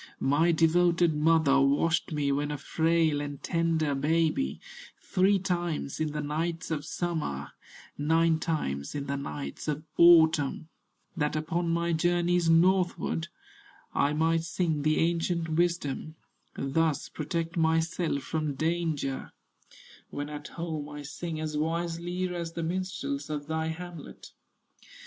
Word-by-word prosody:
"My 155 +5 +3
devoted 170 +1 +3
mother 150 -2 +4
washed 150 +6 +2
me, 145 -2 0
When 145 +1 0
a 150 - -3
frail 160 0 +1
and 145 -1 -5
tender 165 -3 +1
baby, 150 - +1 0.4
Three 195 +2 +2
times 175 -6 -2
in 155 -1 0
the 150 0 -3
nights 165 +3 -2
of 150 -2 -2
summer, 155 - -3 0.5
Nine 160 +2 +3
times 70 - -2
in 140 -1 -3
the 140 0 -2
nights 75 - -6
of 150 0 -2
autumn, 160 -3 +5 0.5
That 150 0 0
upon 165 +2 -1
my 170 0 +1
journeys 175 +1 +2
northward 175 -1 +2 0.7
I 140 - +2
might 165 +2 +2
sing 165 -3 -1
the 155 +1 +2
ancient 170 0 0
wisdom, 160 -2 -1 0.4
Thus 150 +1 0
protect 165 +2 -3
myself 160 -2 +1
from 155 -3 -2
danger; 155 -3 -2 0.8
When 145 +1 -5
at 150 0 -7
home 160 -4 -5
I 150 -1 -7
sing 155 +3 -5
as 155 -1 -3
wisely 170 +3 -2
As 170 -1 -4
the 165 - -3
minstrels 190 - -3
of 150 -1 -3
thy 160 +1 -2
hamlet." 170 -1 -8
160 Hz, 130 wpm, -28 LUFS, 150-170 Hz, 0.8 s, autumn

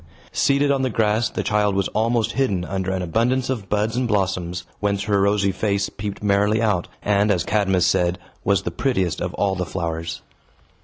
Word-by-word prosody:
Seated 140 +1 +2
on 135 -1 +1
the 130 - +1
grass, 110 0 +1
the - - -3
child 105 -1 +1
was 100 -1 +1
almost 115 0 +1
hidden 100 -10 0
under 95 0 -3
an 95 -1 -1
abundance 125 +9 +1
of 105 -7 -4
buds 105 +2 0
and 125 0 0
blossoms, 90 -4 -1 0.2
whence 100 -1 0
her 100 -1 +1
rosy 100 0 +2
face 100 +1 -1
peeped 105 -1 -6
merrily 105 +1 +2
out, 105 -6 +1 0.2
and, 105 0 +2
as 90 -4 +2
Cadmus 95 -4 +2
said, 90 0 +2 0.3
was 100 -4 +2
the - - -3
prettiest 95 - -1
of - - -3
all 100 -1 +1
the 90 -1 -2
flowers. 85 -2 -4
100 Hz, 190 wpm, -22 LUFS, 95-110 Hz, 0.3 s, Seated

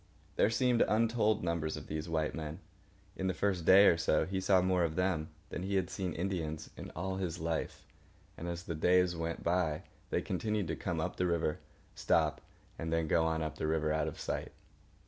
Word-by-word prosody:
There - - +4
seemed 125 +1 +2
untold 110 -1 +2
numbers 85 -2 -1
of - - -8
these 75 +2 -4
white 80 -2 0
men. 80 -1 -5 0.6
In 95 - -2
the 95 - 0
first 95 -5 0
day 95 +3 +8
or 85 - +6
so, 85 - +2
he 95 0 -2
saw 95 0 +4
more 90 -1 +2
of 80 -2 -1
them 90 -4 0 0.2
than - - -5
he 100 +2 -2
had 95 -1 0
seen 95 -1 -3
Indians 80 -4 -3
in - - -8
all 95 +3 -2
his 90 -3 -2
life; 80 0 -3 0.5
and 85 - -6
as 85 0 -4
the 85 - -4
days 90 +2 +3
went 85 0 -3
by 85 -3 +1 0.3
they - - 0
continued 105 0 -1
to - - -1
come - - -3
up - - -2
the 90 - +1
river, 85 -3 0 0.3
stop, - - +1 0.4
and 80 -1 -3
then 80 -1 +1
go 80 +1 +3
on 80 0 0
up 80 - -5
the 80 - -1
river 80 -1 +1
out 80 - 0
of - - -6
sight. - - -3
85 Hz, 205 wpm, -33 LUFS, 80-95 Hz, 0.6 s, day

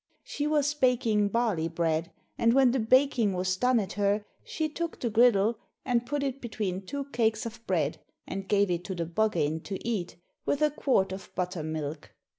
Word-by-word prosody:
She 290 - -3
was 295 -1 +2
baking 240 -7 +2
barley 200 -7 0
bread, 165 0 -1 0.2
and 230 0 +3
when 265 -2 +5
the 260 - 0
baking 240 -2 +3
was 185 0 0
done 250 +4 +3
at 195 -4 -3
her, 205 +1 +1 0.2
she 315 -1 -2
took 330 +2 -4
the 235 - -1
griddle 225 -1 +4 0.3
and 240 -2 +1
put 290 +1 -1
it 275 0 -3
between 205 -5 -3
two 280 -1 -4
cakes 220 -3 +1
of 230 0 -7
bread, 160 -6 0 0.3
and 195 0 -5
gave 200 -2 +3
it 175 0 -1
to 190 - -4
the 170 -1 -2
Buggane 165 -4 0
to 195 +2 -5
eat, 200 -7 -2 0.3
with 285 +1 0
a 300 - +4
quart 255 -10 +1
of 190 -1 -7
buttermilk. 155 -4 -4
215 Hz, 185 wpm, -28 LUFS, 185-250 Hz, 0.3 s, when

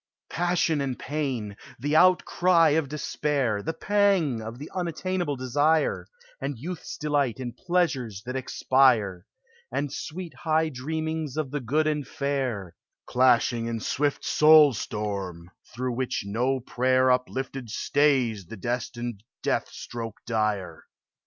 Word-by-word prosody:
Passion 170 -3 +1
and 130 -3 -2
pain, 130 -8 -3 0.2
the 145 +5 -1
outcry 180 -1 +5
of 150 -2 +1
despair, 140 -6 -1
The 160 - -3
pang 190 - +2
of 110 +2 -7
the 145 +4 -9
unattainable 180 -2 -2
desire, 145 +5 +1 0.3
And 140 - -3
youth's 170 +9 -6
delight 145 -6 0
in 120 -2 -5
pleasures 135 - -1
that 125 +1 -5
expire, 120 -7 +2 0.4
And 145 -1 -2
sweet 165 +2 -6
high 160 -1 +1
dreamings 155 +2 -3
of 150 -4 -2
the 145 - -2
good 145 +6 +1
and 150 -3 -1
fair 130 - -2 0.3
Clashing 120 -2 +3
in 115 -1 -2
swift 145 +6 -1
soul 150 -2 +7
storm, 100 -6 -4 0.2
through 125 +1 -3
which 125 -2 -2
no 125 +6 0
prayer 130 +1 +2
Uplifted 125 0 -2
stays 125 - +1
the 115 - -8
destined 120 0 -4 0.2
death - - 0
stroke 115 -2 -7
dire. 105 -7 -1
130 Hz, 125 wpm, -26 LUFS, 115-155 Hz, 0.4 s, soul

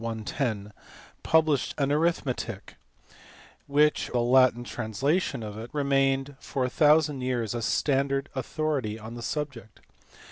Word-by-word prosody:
110, 110 -2 -3 0.5
published 155 -4 +2
an 140 -1 +1
Arithmetic, 140 - -1 0.9
which 150 +2 +2
(or - - -12
rather 120 -1 +1
the 120 - 0 0.3
Latin 120 - -6
translation, 125 - -1
of 105 0 -7
it) 115 +2 -7
remained 135 -1 +1
for 130 -3 -2
a - - -1
thousand 150 -2 +3
years 120 -4 -1
a 120 - -3
standard 140 +3 +1
authority 135 -4 -2
on 110 +1 -9
the 120 - -7
subject. 135 -5 -5
135 Hz, 135 wpm, -27 LUFS, 115-145 Hz, 0.9 s, thousand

